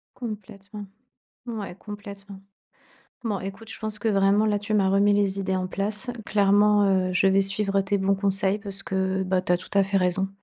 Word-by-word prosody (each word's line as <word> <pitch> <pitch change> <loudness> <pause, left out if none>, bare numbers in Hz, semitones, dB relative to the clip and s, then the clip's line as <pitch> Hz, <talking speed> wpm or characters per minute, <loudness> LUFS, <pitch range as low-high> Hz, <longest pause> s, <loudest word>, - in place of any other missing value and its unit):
Complètement, 205 -2 -8 0.6
ouais, 210 -6 -5
complètement. 200 -1 -10 0.8
Bon, 210 -4 -2
écoute, 195 +4 -8
je - - -8
pense 215 -1 -4
que 225 - -1
vraiment 200 +1 +3
là, 205 -1 +1
tu 205 +1 -5
m'as 195 -2 +3
remis 200 +1 +3
les 200 -1 +1
idées 190 -1 -1
en 185 0 -2
place. 210 +6 -3
Clairement, 205 0 +4 0.2
heu, - - -3
je 185 +2 +2
vais 195 +1 +4
suivre 195 0 +2
tes 200 +1 0
bons 195 +1 +2
conseils 195 0 +1
parce 200 -1 -4
que, 190 0 -1
bah, 185 0 0
tu 180 - 0
as 175 - +2
tout 185 - -10
à 200 - +5
fait 195 0 +1
raison. 185 +1 0
195 Hz, 195 wpm, -25 LUFS, 190-205 Hz, 0.8 s, à